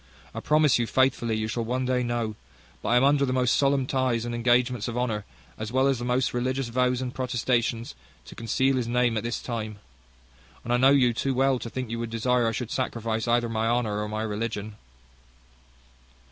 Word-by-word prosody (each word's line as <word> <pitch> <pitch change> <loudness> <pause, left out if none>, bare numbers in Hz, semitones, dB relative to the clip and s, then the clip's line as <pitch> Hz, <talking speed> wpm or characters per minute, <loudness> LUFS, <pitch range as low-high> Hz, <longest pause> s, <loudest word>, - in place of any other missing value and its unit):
I - - -4
promise 150 -4 +3
you 120 - 0
faithfully 125 -3 +1
you 110 0 -2
shall 115 +1 -2
one 125 +3 -1
day 125 0 +1
know; 120 -2 -2 0.5
but - - -3
I 120 - +4
am 125 - +4
under 140 0 +4
the 130 - 0
most 125 -2 +2
solemn 140 -1 +2
ties 130 -3 0
and 120 - -4
engagements 120 -1 +1
of 120 0 -4
honour, 110 -4 -1 0.3
as 110 0 -4
well 130 +1 +2
as 135 -3 +1
the 120 - -4
most 125 +1 +1
religious 130 +1 -1
vows 125 +1 +1
and 125 -1 -4
protestations, 120 - -1 0.3
to - - -11
conceal 130 +4 0
his 120 -2 -1
name 120 -1 +1
at 110 - 0
this 120 0 -2
time. 110 -3 -5 0.9
And 120 - -1
I - - +4
know 130 +2 +5
you 130 -4 +4
too 135 +3 -1
well, 135 0 +2
to 115 - -6
think 125 -1 -5
you 115 - -3
would 115 -1 -3
desire 120 +1 +1
I - - +1
should 115 +1 -4
sacrifice 115 -3 -2
either 120 0 +2
my 115 0 -1
honour 115 -3 0
or 105 - -3
my 110 +1 -3
religion." 105 -1 -4
120 Hz, 210 wpm, -26 LUFS, 115-130 Hz, 0.9 s, know